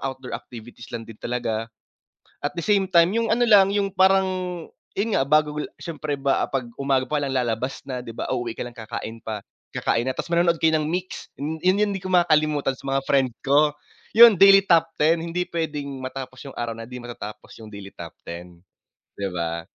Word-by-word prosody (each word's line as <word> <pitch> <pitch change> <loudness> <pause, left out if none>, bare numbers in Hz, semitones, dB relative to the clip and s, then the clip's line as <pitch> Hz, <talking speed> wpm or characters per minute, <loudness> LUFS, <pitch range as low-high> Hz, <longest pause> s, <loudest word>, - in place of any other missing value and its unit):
outdoor 130 -1 -5
activities 120 0 -9
lang 115 - -8
din 115 -1 -13
talaga. 115 -2 -2 0.8
At 145 - -1
the 170 - -4
same 200 +2 +2
time 170 0 +6
'yung 230 -1 +2
ano 240 - 0
lang 200 -2 +6
'yung, 200 -1 +1
parang, 185 -2 +1 0.2
'yun 210 +2 0
nga 135 - +2
bago 150 +1 +2 0.2
syempre 155 -3 -4
ba 135 -1 +1
'pag 125 -3 -3
umaga 135 -2 0
pa 150 - 0
lang 140 -2 -2
lalabas 125 +1 -1
na 125 -1 -4
'di 115 - -7
ba? - - -5
Uuwi 120 -2 -2
ka - - -8
lang 120 0 -11
kakain 110 0 -6
pa 110 -2 -6 0.3
kakain 115 - 0
na, 130 - -1
tapos - - -5
manonood 170 -1 +2
kayo 160 -1 +3
ng 155 - +1
Myx, 180 +4 -4
'yun 150 +3 -3
'yun 185 +2 +3
'yung - - -2
'di 190 - -6
ko 185 - -4
makakalimutan 155 -6 +2
sa - - -18
mga 135 0 +1
friend 135 -2 +3
ko. 145 +2 +3 0.4
'Yun 230 -1 +9
daily 195 +1 +7
top 165 -1 +4
10 160 +2 +3
hindi 175 +2 -2
puwedeng 155 -4 -3 0.2
matapos 130 0 -7
'yung 140 -2 -10
araw 115 -1 -3
na 115 - -8
hindi 125 +2 -8
matatapos 120 -3 -9
'yung 110 -1 -12
daily 100 -1 -9
top 85 -2 -8 0.2
10, 85 0 -9 0.6
'di 100 -1 -3
ba? 85 -1 -3
140 Hz, 205 wpm, -23 LUFS, 120-175 Hz, 0.8 s, Yun